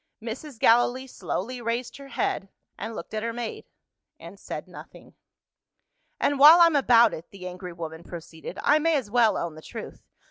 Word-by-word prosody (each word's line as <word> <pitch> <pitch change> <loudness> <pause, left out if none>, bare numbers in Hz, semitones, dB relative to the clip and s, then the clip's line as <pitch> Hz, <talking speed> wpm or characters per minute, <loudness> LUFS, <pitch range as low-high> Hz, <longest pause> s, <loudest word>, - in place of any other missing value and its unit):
Mrs. 240 +4 -7
Gallilee 245 +3 +3
slowly 245 +1 -5
raised 235 +1 -3
her 275 0 -11
head, 195 -7 -2 0.3
and 225 +1 -6
looked - - -8
at 215 - -2
her 230 +1 -2
maid 235 -1 -6 0.5
and - - -12
said - - -7
nothing. - - -13 1.1
"And 285 -1 +1
while 310 +5 +10
I'm 335 -2 +6
about 235 -4 +5
it," 160 - -8
the 185 -2 -9
angry 180 0 -8
woman 165 -1 -7
proceeded, 165 -2 -9
"I 300 +1 +4
may 325 +1 +2
as 245 -8 -2
well 235 -2 +3
own 170 -2 -3
the 155 - -12
truth. - - -9
230 Hz, 175 wpm, -26 LUFS, 185-265 Hz, 1.1 s, while